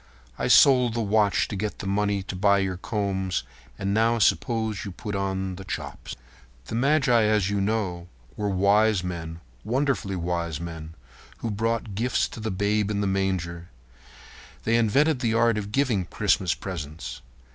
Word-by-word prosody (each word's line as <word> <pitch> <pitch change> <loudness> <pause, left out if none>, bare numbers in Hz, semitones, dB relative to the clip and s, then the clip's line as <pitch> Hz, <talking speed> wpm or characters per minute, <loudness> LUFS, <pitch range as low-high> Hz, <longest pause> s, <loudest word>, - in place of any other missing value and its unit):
I - - 0
sold 125 -4 +6
the 115 - 0
watch 105 -2 +2
to - - -5
get 105 +2 -3
the - - -7
money 100 0 0
to 95 - -6
buy 100 +2 +4
your 95 -2 -1
combs. 95 - -2 0.3
And 100 +1 -1
now 115 +2 +3
suppose 110 -1 +1
you 100 - -6
put 105 +4 -6
the 95 -1 -3
chops 95 - -6
on." - - -29 0.4
The - - -8
magi, 125 -2 +3
as 105 -2 +2
you 100 -1 0
know, 95 -4 -1 0.3
were 105 -1 -2
wise 100 +1 +3
men—wonderfully 90 - -3
wise 85 -3 -2
men—who 80 - -8
brought 115 0 -1
gifts 120 +6 0
to - - -9
the 110 0 -3
Babe 100 +1 0
in 100 -1 -1
the - - 0
manger. 95 -3 -2 0.9
They 115 - +2
invented 130 +6 +3
the 115 -3 0
art 115 -1 +3
of 105 0 -6
giving 115 -7 +1
Christmas 90 +1 +1
presents. 75 -7 -6
100 Hz, 155 wpm, -25 LUFS, 90-110 Hz, 0.9 s, sold